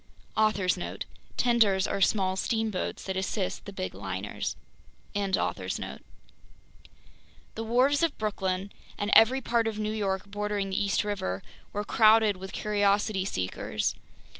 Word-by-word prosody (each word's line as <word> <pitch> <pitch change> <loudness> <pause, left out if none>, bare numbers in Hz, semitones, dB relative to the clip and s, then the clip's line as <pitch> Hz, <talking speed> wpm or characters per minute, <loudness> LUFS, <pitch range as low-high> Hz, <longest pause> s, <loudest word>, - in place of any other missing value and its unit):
* - - -32
*Author's 205 -5 +2
Note: 175 - -5 0.3
Tenders 215 -6 +3
are 200 - -2
small 190 -2 +3
steamboats 220 -1 -1
that 190 - -3
assist 190 0 -2
the 200 - -6
big 185 -1 -4
liners. 95 +1 -4 0.6
The 200 -2 -2 1.6
wharves 255 +6 +3
of 330 -3 +1
Brooklyn, 195 -2 -2 0.3
and 205 +1 -1
every 255 +4 +7
part 235 -2 +1
of 220 -1 -2
New 215 0 -1
York 195 -3 -1
bordering 205 -1 -2
the 195 - +1
East 200 +1 +1
River, 145 - -3 0.3
were 205 - -2
crowded 215 -1 +5
with 190 +1 -8
curiosity 205 -1 +1
seekers. 95 - -2
205 Hz, 130 wpm, -28 LUFS, 190-220 Hz, 1.6 s, every